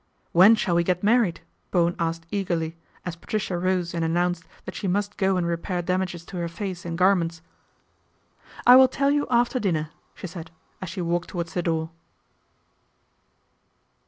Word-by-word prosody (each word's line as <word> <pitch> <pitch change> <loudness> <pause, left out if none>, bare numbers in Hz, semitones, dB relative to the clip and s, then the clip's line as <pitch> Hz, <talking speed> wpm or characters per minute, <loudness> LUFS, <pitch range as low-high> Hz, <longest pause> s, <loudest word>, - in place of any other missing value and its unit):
1 170 - +4
When 215 +4 +9
shall 185 -5 -1
we 170 0 +3
get 180 +1 -1
married? 220 -4 +2 0.2
" - - -44
Bowen 175 -1 +2
asked 165 0 -2
eagerly, 170 -5 -2 0.3
as 175 -2 -4
Patricia 190 +1 -3
rose 180 -1 0
and 165 -1 -1
announced 175 +1 0 0.2
that - - -6
she 195 - -4
must 205 +2 -1
go 190 -1 +1
and 175 - 0
repair 170 +1 -2
damages 180 -1 -2
to 185 - -8
her 170 -1 -2
face 180 +1 -6
and 165 0 -4
gar 185 +2 +5
ments. 165 -3 -3 0.6
" - - -21
I 250 +1 +9
will 260 0 +8
tell 275 +2 +1
you 290 0 +1
after 245 +1 +2
dinner," 155 -8 -1 0.2
she - - -8
said 170 -2 -8 0.3
as 185 - -5
she 180 +2 -5
walked 175 +1 -1
towards 170 -2 -4
the 175 - 0
door. 160 -1 -1
175 Hz, 185 wpm, -25 LUFS, 170-195 Hz, 0.6 s, When